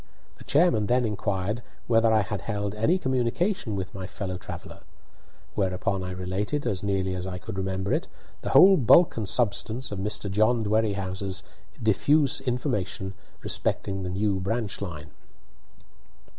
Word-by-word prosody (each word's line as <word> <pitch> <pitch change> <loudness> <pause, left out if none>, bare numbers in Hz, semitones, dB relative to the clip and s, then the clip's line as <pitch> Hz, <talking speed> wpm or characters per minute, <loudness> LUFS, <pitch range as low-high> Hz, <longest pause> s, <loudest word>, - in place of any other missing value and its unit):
The - - -11
chairman 140 - +3
then 125 +1 +2
inquired 105 0 -2 0.2
whether 115 -1 +4
I 110 -1 +4
had 100 0 -4
held 105 -2 -3
any 115 +13 +2
communication 130 - 0
with 95 0 -4
my 95 -2 -6
fellow 95 -3 -5
traveller; 90 - -9 0.7
whereupon 95 0 -1
I 90 - -4
related, 95 +10 -2
as 95 -2 -1
nearly 95 -2 0
as 90 0 -4
I 90 -1 -4
could 95 +1 -7
remember 95 0 -2
it, - - 0 0.3
the - - -3
whole 190 +1 +8
bulk 155 +7 +5
and 105 -4 0
substance 120 +2 +1
of 100 - -4
Mr. 105 +1 -1
John 110 +3 +3
Dwerrihouse's 100 -3 -1 0.4
diffuse 135 +6 +3
information 120 -7 -2 0.3
respecting 95 0 0
the 90 - -3
new 95 +1 0
branch 105 +3 -2
line. 80 -7 -6
105 Hz, 145 wpm, -26 LUFS, 95-115 Hz, 0.7 s, whole